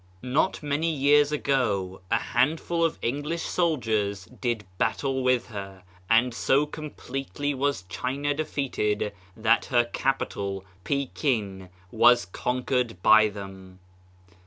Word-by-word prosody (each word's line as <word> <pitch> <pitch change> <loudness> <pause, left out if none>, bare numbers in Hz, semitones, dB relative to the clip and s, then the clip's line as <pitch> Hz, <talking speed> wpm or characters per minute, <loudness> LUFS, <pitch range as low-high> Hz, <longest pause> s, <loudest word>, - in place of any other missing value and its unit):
Not 140 +7 0
many 150 +3 0
years 145 0 +4
ago, 105 -11 0
a 115 - +3
handful 160 +9 0
of 165 - +1
English 145 +7 -2
soldiers 110 - 0
did 115 +1 -3
battle, 110 +6 0
with 125 -2 +2
her, 100 -3 -8 0.3
and 120 +2 +4
so 135 +5 +2
com 155 0 -7
pletely 135 +2 -4
was 140 -5 0
China 135 +9 -2
defeated 130 -9 -1 0.2
that 115 +1 +3
her 120 -2 +3
capital, 100 -6 -2 0.2
Pekin, 115 - -1 0.2
was 120 -1 +5
conquered 125 +2 -1
by 110 0 +7
them. 95 -2 -9
125 Hz, 115 wpm, -26 LUFS, 105-145 Hz, 0.3 s, by